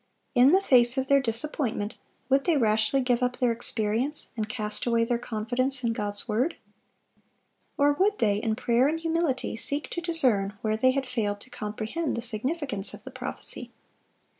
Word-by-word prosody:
In 250 +2 +6
the 380 +2 +4
face 245 -4 +5
of 265 - +1
their 275 +1 +4
disappointment, 235 -3 0 0.3
would 275 +1 +2
they 335 -4 +3
rashly 220 +2 +2
give 250 -1 +1
up 250 0 0
their 245 -2 +2
experience, 230 +4 -1
and 215 -2 -3
cast 210 +1 -2
away 230 -1 +2
their 235 0 0
confidence 245 +4 -1
in 230 -1 +1
God's 205 -1 -2
word? 240 +9 0 1.2
or 290 0 +4
would 400 +7 +1
they, 205 -2 +2
in 220 0 -1
prayer 245 +2 +2
and 320 +2 -1
humility, 325 -7 -1
seek 285 +6 0
to 345 - -3
discern 250 - +1
where 215 -1 0
they 255 +4 +3
had 265 0 -1
failed 210 -5 -2
to 255 - -14
comprehend 220 +9 -4
the 235 - -3
significance 245 - -1
of - - -16
the - - -9
prophecy? - - -4
245 Hz, 175 wpm, -27 LUFS, 220-275 Hz, 1.2 s, In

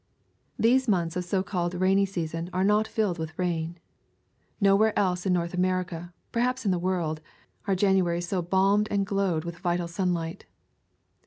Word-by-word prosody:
These 255 +3 +3
months 175 -5 +1
of 180 - -1
so 185 +2 0
called 180 -3 -2
rainy 190 +2 +3
season 165 -2 -4
are 185 +1 +1
not 210 +2 +3
filled 215 -6 -1
with 160 0 -5
rain. 170 -2 -2 0.8
Nowhere 200 +1 +4
else 180 -1 +1
in 185 - +3
North 170 0 -1
America, 180 -1 -1 0.2
perhaps 250 +1 0
in 195 - +3
the 180 - +1
world, 170 -4 -1 0.5
are 195 - +2
Januarys 185 -3 +2
so 180 +1 -1
balmed 195 +4 +2
and 200 -1 +1
glowed 190 -5 0
with 170 0 -6
vital 175 -1 -1
sunlight. 170 -2 -2
185 Hz, 160 wpm, -27 LUFS, 170-195 Hz, 0.8 s, Nowhere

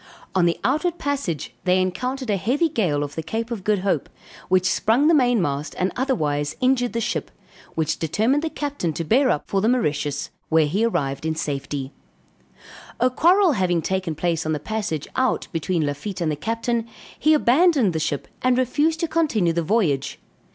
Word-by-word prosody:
On 180 -2 +3
the 170 - 0
outward 315 +7 +1
passage 275 - -3
they 185 0 +3
encountered 250 +7 -2
a - - +2
heavy 255 - +1
gale 175 - 0
off 145 0 -6
the 160 - -3
Cape 225 +8 -4
of 220 -5 -4
Good 205 -2 +1
Hope, 170 -8 0 0.4
which 185 0 +3
sprung 230 +9 +2
the 330 - +5
mainmast 200 - +1
and 185 +1 0
otherwise 150 - -1
injured 250 -3 +2
the 230 - 0
ship, 230 - -2 0.5
which 160 -1 -1
determined 220 - +1
the 325 - -2
captain 285 - -3
to 165 - -3
bear 255 - +3
up 150 - -1
for 195 - 0
the 220 - +2
Mauritius, 150 - -1 0.2
where 160 -1 +4
he 190 +9 0
arrived 140 -12 -1
in 160 0 -1
safety; 140 -2 -4 1.1
a 255 - +3
quarrel 355 +6 +4
having 180 - +1
taken 190 -4 -2
place 165 0 -1
on 155 - -1
the 150 - -2
passage 200 -4 -3
out 260 0 +1
between 165 0 -1
Lafitte 145 +8 -4
and 160 -2 +1
the - - -1
captain, 230 +7 -2 0.3
he 310 0 +4
abandoned 280 - +4
the 160 - -1
ship 145 -2 -2
and 255 -1 +3
refused 295 +6 +1
to 335 - +1
continue 280 - +1
the 170 - 0
voyage. 165 - 0
195 Hz, 185 wpm, -23 LUFS, 160-255 Hz, 1.1 s, the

